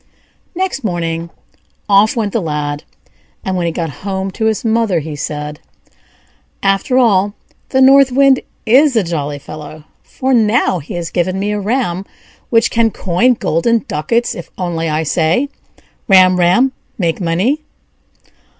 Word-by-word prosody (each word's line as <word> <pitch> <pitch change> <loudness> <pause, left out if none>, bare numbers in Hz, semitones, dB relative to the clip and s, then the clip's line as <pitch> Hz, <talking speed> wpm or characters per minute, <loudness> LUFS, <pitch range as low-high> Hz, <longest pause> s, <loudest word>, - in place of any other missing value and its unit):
Next 370 -7 -2
morning 170 -4 -2 0.6
off 205 +2 +4
went 215 -4 -2
the 230 - 0
Lad; 150 -2 -3 0.6
and 190 -2 -1
when 175 -2 -1
he - - 0
got 165 -2 -3
home 190 -1 -3
to 220 - -3
his 220 +1 0
mother, 225 -4 +1
he 155 0 -6
said: 150 0 -5 1.0
"After 195 +6 +1
all, 205 -4 +3 0.3
the 265 - +2
North 270 0 +6
Wind 275 0 +4 0.3
is 265 +4 +4
a 220 - +3
jolly 150 -4 -3
fellow; 150 +1 -10 0.2
for 260 0 -2
now 220 -5 +2
he 155 +3 -8
has 170 -2 -4
given 185 +2 -1
me 205 +1 -1
a 210 - -1
ram 200 -4 -1 0.5
which 230 -1 +3
can 230 -1 +2
coin 220 +6 +1
golden 225 +6 0
ducats 230 +11 -1
if 175 - -9
I 185 - -3
only 165 -2 -1
say: 170 - +1 0.6
'Ram, 185 -2 +5
ram! 185 +10 +3 0.3
make 170 -2 -1
money!'" 185 - 0
190 Hz, 150 wpm, -15 LUFS, 165-230 Hz, 1.0 s, North